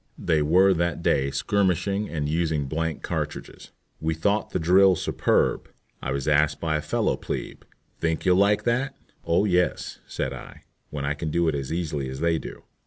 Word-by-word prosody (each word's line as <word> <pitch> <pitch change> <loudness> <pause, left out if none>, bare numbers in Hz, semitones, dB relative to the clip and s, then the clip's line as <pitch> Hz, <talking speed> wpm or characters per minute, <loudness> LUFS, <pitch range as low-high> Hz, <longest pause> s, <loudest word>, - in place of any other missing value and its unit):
They 80 -3 +1
were 90 +6 +5
that 85 -2 -1
day 70 0 +2
skirmishing 100 +4 0
and 75 -3 -2
using 80 -2 0
blank 80 +2 -3
cartridges. - - -5 0.3
We 80 0 -1
thought 100 +6 0
the - - -2
drill 95 +3 +5
superb. - - 0 0.3
I - - -4
was 70 0 -2
asked 75 0 +3
by 80 -2 -1
a 75 - 0
fellow - - 0
"plebe," - - -5 0.4
"Think 80 -1 -1
you'll 90 -1 +4
like 105 +2 +3
that?" 125 +4 0 0.3
"Oh 85 +5 +2
yes," 90 -3 0
said - - -3
I, - - -11 0.3
"when 75 -2 -4
I 70 - 0
can 80 +2 -4
do 85 +2 +1
it 80 - +2
as 70 -1 -4
easily 75 -5 -2
as 65 +1 -6
they 85 0 +1
do." - - -9
80 Hz, 180 wpm, -25 LUFS, 75-95 Hz, 0.4 s, were